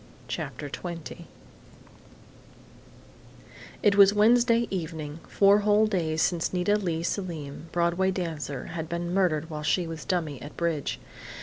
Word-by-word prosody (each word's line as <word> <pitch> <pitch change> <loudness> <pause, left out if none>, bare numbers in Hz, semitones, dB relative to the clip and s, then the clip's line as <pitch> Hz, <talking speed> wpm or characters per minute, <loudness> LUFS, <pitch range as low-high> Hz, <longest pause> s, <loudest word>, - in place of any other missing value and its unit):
CHAPTER 145 - -5
TWENTY 170 +2 -7 2.6
It 205 -1 +5
was 200 0 +7
Wednesday 235 +2 +4
evening, 160 -4 -4
four 200 +1 +5
whole 210 +1 +4
days 165 -7 0
since 170 -2 0
Nita 180 +3 +2
Leigh 170 -5 -1
Selim, 165 -5 -4
Broadway 175 +2 +1
dancer, 160 -7 -4
had 160 -1 -4
been 170 +1 -3
murdered 165 -4 +1
while 150 -1 -4
she 150 +4 +1
was 165 -1 -6
dummy 155 -8 -2
at 145 - -10
bridge. 165 -4 -1
170 Hz, 125 wpm, -27 LUFS, 160-195 Hz, 2.6 s, was